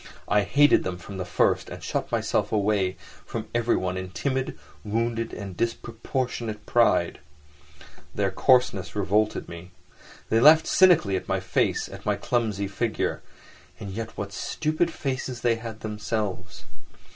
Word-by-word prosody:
I 105 - +3
hated 140 +9 +4
them 90 -1 -3
from 95 +3 -9
the 90 - -3
first, 90 - +1
and - - -9
shut - - -3
myself - - 0
away 100 -3 +1 0.3
from 115 -2 -5
everyone 110 -6 0
in 95 0 -5
timid, 130 +6 -2 0.3
wounded 115 +1 -1
and 100 -3 -7
disproportionate 115 0 -3
pride. 120 +1 +2 1.0
Their - - +1
coarseness 125 -8 +2
revolted 105 +2 +1
me. 85 +2 -9 0.6
They 115 - +3
laughed 155 +5 +7
cynically 170 - +5
at - - -7
my - - +1
face, - - 0
at - - -10
my - - +1
clumsy 110 -5 -1
figure; 110 +3 -2 0.6
and 100 -3 -6
yet 110 +3 -6
what 100 0 -5
stupid 155 - -1
faces 130 -5 -4
they 115 -1 +2
had 110 -1 -8
themselves. 105 -3 -4
110 Hz, 140 wpm, -26 LUFS, 100-120 Hz, 1.0 s, laughed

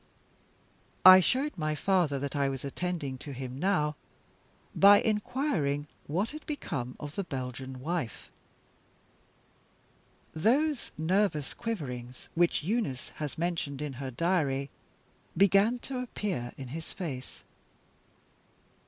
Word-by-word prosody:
I 185 0 +12
showed 270 +10 +1
my 155 -2 -1
father 175 -4 +2
that 140 +2 -4
I 140 -1 +2
was 135 0 -5
attending 145 -3 -3
to 145 - -7
him 130 0 -6
now, 155 -5 +1 0.8
by 200 +1 +8
inquiring 210 - 0 0.2
what 185 +10 0
had 305 +1 -8
become 135 - -4
of 145 -1 -6
the 200 - -2
Belgian 130 -3 -5
wife. 155 - -4 2.0
Those 260 - +2
nervous 160 -2 +1
quiverings, 130 - -5
which 170 -2 +2
Eunice 175 - -1
has 150 -2 -3
mentioned 165 -5 -2
in 150 -2 -3
her 135 - -3
diary, 140 -2 0 0.7
began 200 +5 +5
to 260 -2 -3
appear 200 - -3
in 130 -2 -7
his 160 +4 -7
face. 135 -8 -6
155 Hz, 115 wpm, -30 LUFS, 135-200 Hz, 2.0 s, I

